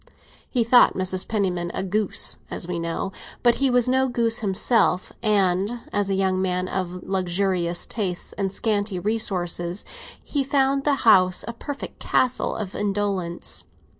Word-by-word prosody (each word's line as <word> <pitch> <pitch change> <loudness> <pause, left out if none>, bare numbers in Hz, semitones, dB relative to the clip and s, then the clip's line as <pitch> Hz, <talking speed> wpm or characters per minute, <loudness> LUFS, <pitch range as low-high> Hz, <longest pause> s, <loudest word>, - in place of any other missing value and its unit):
He 245 -3 +1
thought 245 +2 +5
Mrs. 185 0 -1
Penniman 185 -5 -1
a - - -2
goose, 205 +1 +2
as 170 - -3
we 175 -1 -3
know; 170 +3 -3 0.3
but 240 -1 +6
he 270 - +4
was 245 -1 +3
no 260 +1 +2
goose 235 -1 +1
himself, 195 -2 +1
and, 205 +1 +1
as 205 -1 0
a 195 - +1
young 190 -1 +1
man 185 -1 -1
of 180 -1 -4
luxurious 185 -2 0
tastes 190 -6 -3
and 195 -2 -2
scanty 205 -1 -1
resources, 180 -3 -1 0.4
he 285 -2 -1
found 275 0 +1
the 290 -1 +3
house 185 -4 +5
a 235 - -4
perfect 285 +4 -7
castle 255 0 +1
of 205 -3 -5
indolence. 200 -4 -2
195 Hz, 150 wpm, -23 LUFS, 185-230 Hz, 0.4 s, but